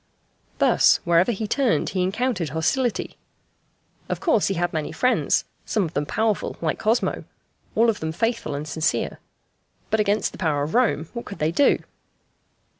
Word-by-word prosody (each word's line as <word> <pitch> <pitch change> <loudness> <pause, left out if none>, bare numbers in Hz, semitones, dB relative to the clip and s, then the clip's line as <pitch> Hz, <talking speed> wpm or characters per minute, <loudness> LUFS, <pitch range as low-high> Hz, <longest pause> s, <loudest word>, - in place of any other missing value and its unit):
Thus, - - +4
wherever 170 +5 +3
he 220 0 -3
turned 260 0 +1
he 185 - -1
encountered 190 - -1
hostility. 215 - -1 0.9
Of - - -2
course 315 - +2
he 195 - -1
had 175 +1 -1
many 155 -2 -2
friends 250 +11 +1 0.2
some 210 - 0
of 165 -2 -4
them 145 +1 -1
powerful 220 +2 -1
like 160 -2 -1
Cosmo, 225 +3 0 0.5
all 230 +2 +4
of 220 -3 +1
them 160 0 -3
faithful 225 -3 -1
and 145 +2 -5
sincere. 155 +2 -1 0.7
But 220 - +2
against 210 0 +1
the - - -12
power 150 -5 +1
of 150 - -4
Rome 230 -10 +2
what 235 - -6
could 200 - -8
they 155 +1 0
do? 275 +11 +4
195 Hz, 165 wpm, -23 LUFS, 160-230 Hz, 0.9 s, Thus